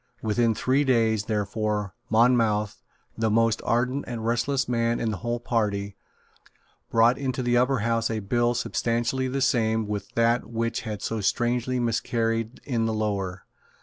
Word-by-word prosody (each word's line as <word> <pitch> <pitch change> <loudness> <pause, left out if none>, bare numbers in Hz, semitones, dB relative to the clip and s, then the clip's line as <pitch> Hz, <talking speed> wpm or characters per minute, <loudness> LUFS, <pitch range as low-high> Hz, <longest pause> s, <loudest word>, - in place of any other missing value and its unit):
Within 115 +1 +2
three 130 +6 +2
days, 115 -5 +2
therefore, 105 -2 -2 0.2
Monmouth, 110 -2 +2 0.3
the 110 0 0
most 115 +1 +2
ardent 125 +4 0
and 115 -2 -5
restless 125 +4 0
man 115 -1 0
in 115 - -1
the 105 - -3
whole 120 +5 -3
party, 100 -4 -1 0.9
brought 115 +3 +4
into 130 -2 -2
the 120 0 +1
Upper 125 -1 +2
House 115 0 0
a 110 - -1
bill 120 +4 +1
substantially 120 +2 -1
the 135 +1 -2
same 110 -4 +1
with 100 -1 -4
that 115 +1 +2
which 115 0 -2
had 105 -2 -5
so 115 -1 -2
strangely 120 +4 0
miscarried 115 -1 -1
in 115 -4 -1
the 110 - -1
Lower. 100 -4 -2
115 Hz, 150 wpm, -25 LUFS, 110-120 Hz, 0.9 s, brought